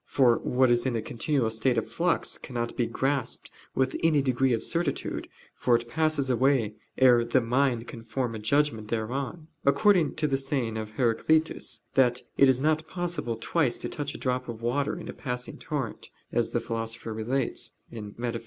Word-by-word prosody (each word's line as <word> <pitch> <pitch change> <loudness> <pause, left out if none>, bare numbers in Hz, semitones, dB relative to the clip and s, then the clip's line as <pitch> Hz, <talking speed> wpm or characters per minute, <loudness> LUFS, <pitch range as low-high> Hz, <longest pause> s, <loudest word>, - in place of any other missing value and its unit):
For 125 -4 +4
what 130 0 +2
is 120 +2 +3
in 125 - 0
a 115 - 0
continual 120 0 0
state 115 +2 +1
of 115 - 0
flux, 175 0 0
cannot 120 -2 -4
be 120 - +1
grasped 135 +2 -2 0.2
with 130 0 +1
any 155 -4 +4
degree 130 0 +2
of 115 -2 +1
certitude, 165 -4 -1 0.3
for 120 - +2
it 120 0 -1
passes 155 +1 +1
away 125 -3 +2 0.2
ere 125 -2 +6
the 120 +2 +3
mind 120 0 +1
can 115 - -8
form 115 +1 -2
a 110 - -5
judgment 110 -1 +1
thereon: 130 +8 -3 0.2
according 165 +1 +4
to 155 - 0
the 135 -2 +1
saying 135 -5 -1
of 110 -1 -5
Heraclitus, 135 +8 +1
that 125 -2 +3
"it 135 - +6
is 130 -1 +3
not 155 +2 +1
possible 175 -10 -3
twice 135 +1 +1
to - - -5
touch 145 -1 -4
a - - -5
drop 125 -1 -2
of 115 -1 -7
water 140 +4 0
in - - -8
a - - -5
passing 125 -2 -5
torrent," 135 -7 -4 0.2
as - - +1
the - - 0
Philosopher 115 0 -4
relates 120 +4 -2 0.2
(Metaph. 115 +2 -4
125 Hz, 180 wpm, -28 LUFS, 115-140 Hz, 0.3 s, ere